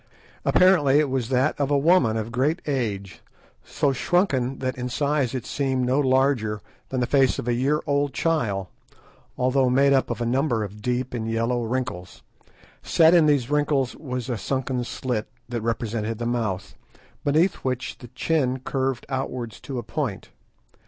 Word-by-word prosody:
Apparently 165 -7 +4
it 150 -3 +2
was 130 -3 -1
that 130 +3 +2
of 140 -1 +1
a 145 - +3
woman 140 -7 +3
of 110 +1 -4
great 140 +8 +1
age 105 -9 -3 0.4
so 140 -2 0
shrunken 135 -4 +1
that 130 -1 -2
in 125 0 -4
size 140 -1 0
it 130 - -4
seemed 130 -3 -1
no 130 +3 +2
larger 130 -6 +2 0.3
than 130 -1 -1
the - - +2
face 135 0 +3
of - - -5
a 120 - +2
year 140 +5 +1
old 145 -1 +1
child, 115 - 0 0.7
although 130 +1 +2
made 140 +2 +4
up 135 - +2
of 120 -2 -3
a 120 - -1
number 120 -2 +1
of 105 +1 -8
deep 125 +2 -2
and 115 -2 -3
yellow 115 +2 0
wrinkles. 115 -7 -4 0.6
Set 160 +1 +4
in 165 -3 +6
these 140 -3 +2
wrinkles 145 -3 +1
was 125 -5 -5
a 120 -4 -2
sunken 130 +1 -2
slit, 120 -2 -3 0.2
that 120 -1 -3
represented 115 -1 -2
the 120 - -4
mouth, 110 -5 -2 0.5
beneath 160 +6 +2
which 130 -1 -3
the 120 - -10
chin 130 +1 0
curved 135 -2 -2
outwards 130 -4 -4
to 135 - -6
a 120 - -3
point. 120 -4 -4
130 Hz, 170 wpm, -24 LUFS, 120-140 Hz, 0.7 s, in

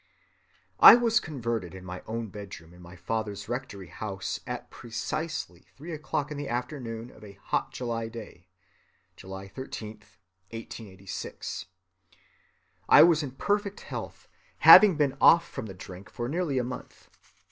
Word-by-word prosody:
"I - - +12
was 235 -1 +3
converted 115 - -4
in 95 -1 -10
my 90 0 -7
own 115 0 -4
bedroom 95 -5 -10
in 90 - -16
my 85 +1 -12
father's 105 +2 -4
rectory 115 -7 -5
house 100 -3 -5
at - - -6
precisely 120 - -5
three 160 +5 -8
o'clock 150 -1 -3
in 150 - -5
the 145 -1 -5
afternoon 120 -2 -4
of - - -17
a 100 -1 -11
hot - - -2
July 115 -2 -3
day 110 -6 -11 0.7
(July 95 +1 -9
13, 110 -1 -8 0.5
1886). 100 -4 -7 1.2
I - - +9
was 165 -2 +5
in 135 -4 -5
perfect 205 +6 -1
health, - - -8 0.4
having 205 -5 +10
been 145 -3 +1
off 170 0 +7
from 110 - -6
the 95 - -9
drink 90 +2 -11
for 120 - -4
nearly 155 -1 -1
a 125 - +1
month. 125 +1 -8
115 Hz, 145 wpm, -28 LUFS, 100-145 Hz, 1.2 s, I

